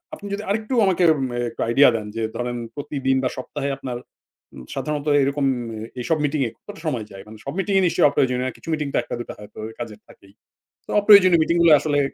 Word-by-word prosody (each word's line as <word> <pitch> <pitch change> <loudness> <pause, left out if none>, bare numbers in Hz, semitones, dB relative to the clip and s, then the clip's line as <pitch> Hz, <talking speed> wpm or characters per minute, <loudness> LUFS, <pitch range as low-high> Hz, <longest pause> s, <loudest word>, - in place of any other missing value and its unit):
আপনি 205 - -13
যদি 205 +1 -3
আরেকটু 215 +4 -1
আমাকে 185 -1 +2 0.3
মে 120 - -4
একটু 115 - -8
আইডিয়া 135 +3 +6
দেন 105 -1 -4
যে, 115 - -2
ধরেন 120 0 -3 0.2
প্রতিদিন 135 -2 -1
বা, 130 - +1
সপ্তাহে 140 +2 -4
আপনার 125 -3 -5 0.6
উ - - -11 0.2
সাধারণত 150 +2 -3 0.2
এরকম 140 +1 0 0.3
এ - - -6 0.2
এইসব 160 +6 0
মিটিংয়ে 140 -4 0
কতটা 205 -5 -12
সময় 120 -8 -2
যায়? 95 0 -10
মানে, 110 0 -11
সব 140 - -4
মিটিংয়ে 195 -1 +2
নিশ্চয়ই 165 - +4
অপ্রয়োজনীয় 125 -2 +1
না, 130 - -4
কিছু - - -17
মিটিং 150 -2 -1
তো - - +1
১ - - -15
টা, - - -2
২ - - -3
টা - - -5
হয়তো 105 +1 -12 0.2
কাজের 110 -3 -7
থাকেই। 100 0 -19 0.5
তো - - -6
অপ্রয়োজনীয় 185 -5 +7
মিটিংগুলো 170 0 +3
আসলে 145 -2 0
140 Hz, 215 wpm, -22 LUFS, 120-170 Hz, 0.6 s, অপ্রয়োজনীয়